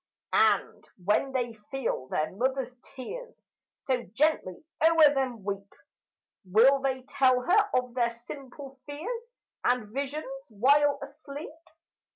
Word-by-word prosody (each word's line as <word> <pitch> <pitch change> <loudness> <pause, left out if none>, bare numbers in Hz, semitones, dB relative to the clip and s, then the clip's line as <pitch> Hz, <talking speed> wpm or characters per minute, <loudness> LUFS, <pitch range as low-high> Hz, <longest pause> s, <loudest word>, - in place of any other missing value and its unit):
And - - +2
when 210 +8 +2
they 245 -3 -1 0.2
feel 260 - -2
their 155 +3 -1
mother's 255 +4 -1 0.2
tears 485 - -8 0.4
So 255 -2 +1
gently 280 - +1 0.2
o'er 320 -2 +7
them 255 -6 -2
weep, 200 0 -4 0.7
Will 230 +9 +5
they 265 -1 -1
tell 255 -1 +3
her 410 +8 +3
of 250 -1 0
their 240 -1 +2
simple 265 +3 -10
fears 375 +12 -5 0.4
And 245 -4 +1
visions 280 +3 -3 0.2
while 280 +6 +4
asleep? 285 +1 -9
265 Hz, 120 wpm, -28 LUFS, 235-290 Hz, 0.7 s, o'er